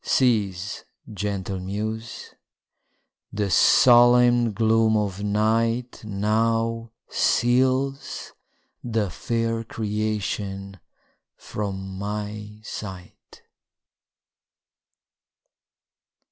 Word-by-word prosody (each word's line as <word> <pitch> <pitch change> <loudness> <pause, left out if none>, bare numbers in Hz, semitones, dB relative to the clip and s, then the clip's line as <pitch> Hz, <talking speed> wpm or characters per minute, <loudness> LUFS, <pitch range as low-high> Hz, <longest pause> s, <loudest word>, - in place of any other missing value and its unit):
Cease, 100 -7 0 0.3
gentle 100 -1 -3
muse! 110 +4 -5 1.0
the 100 -2 -2
solemn 120 +1 +6
gloom 110 +1 +3
of 100 -2 -2
night 115 +4 0
Now 115 +2 0 0.2
seals 130 +3 +1 0.5
the 110 -5 -1
fair 115 +6 -2
creation 105 -3 -3 0.6
from 95 -2 -5
my 105 +1 -5
sight. 95 -5 -9
110 Hz, 60 wpm, -24 LUFS, 100-115 Hz, 1.0 s, solemn